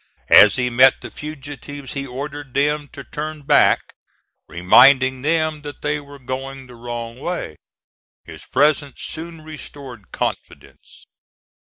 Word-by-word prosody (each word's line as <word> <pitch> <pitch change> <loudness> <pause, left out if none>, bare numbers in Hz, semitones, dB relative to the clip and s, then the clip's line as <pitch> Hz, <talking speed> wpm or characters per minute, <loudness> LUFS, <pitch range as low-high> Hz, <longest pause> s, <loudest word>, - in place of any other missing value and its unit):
As 105 - +8
he 125 -1 -1
met 130 +2 +5
the - - -9
fugitives 145 -2 -8
he 140 -1 -4
ordered 140 +1 -7
them 145 +1 +1
to 140 - -9
turn 150 +2 -6
back, 145 +1 +3 0.5
reminding 130 - +5
them 155 0 0
that 145 -1 -10
they 150 0 0
were 145 0 -13
going 135 +1 -6
the 125 - -14
wrong 120 0 -7
way. 175 - -4 0.7
His - - -11
presence 145 -1 +1
soon 165 0 -6
restored 140 -7 -10
confidence. - - -6
140 Hz, 130 wpm, -20 LUFS, 130-150 Hz, 0.7 s, As